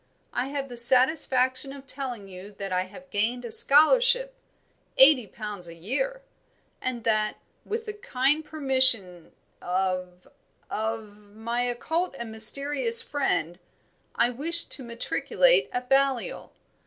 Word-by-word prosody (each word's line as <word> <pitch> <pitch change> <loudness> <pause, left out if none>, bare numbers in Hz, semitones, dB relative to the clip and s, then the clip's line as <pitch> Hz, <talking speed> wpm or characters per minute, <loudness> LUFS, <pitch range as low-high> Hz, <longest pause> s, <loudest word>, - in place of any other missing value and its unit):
I 250 - -3
have 275 0 -5
the 245 -2 -10
satisfaction 260 +1 +4
of 275 -1 -12
telling 250 -7 -5
you 185 +1 -12
that 195 -1 -7
I 185 0 -1
have 270 +9 -16
gained 235 +4 -2
a 235 - -8
scholarship - - +4 0.6
eighty 265 -4 +5
pounds 205 -3 -9
a 170 - -12
year 395 - -5 0.6
and 245 -3 -5
that, 215 -1 -1 0.3
with 450 +2 -5
the 425 - -6
kind 295 -6 -1
permission 260 - +2 0.3
of 185 0 -4 0.4
of 220 -1 -5 0.2
my 230 +2 -4
occult 315 +7 -3
and 235 -2 -8
mysterious 280 - +5
friend, 175 - -3 0.6
I 240 +1 +1
wish 330 +7 -1
to - - -4
matriculate 400 - 0
at 250 0 -5
Balliol. 270 -2 -1
250 Hz, 130 wpm, -24 LUFS, 215-285 Hz, 0.6 s, eighty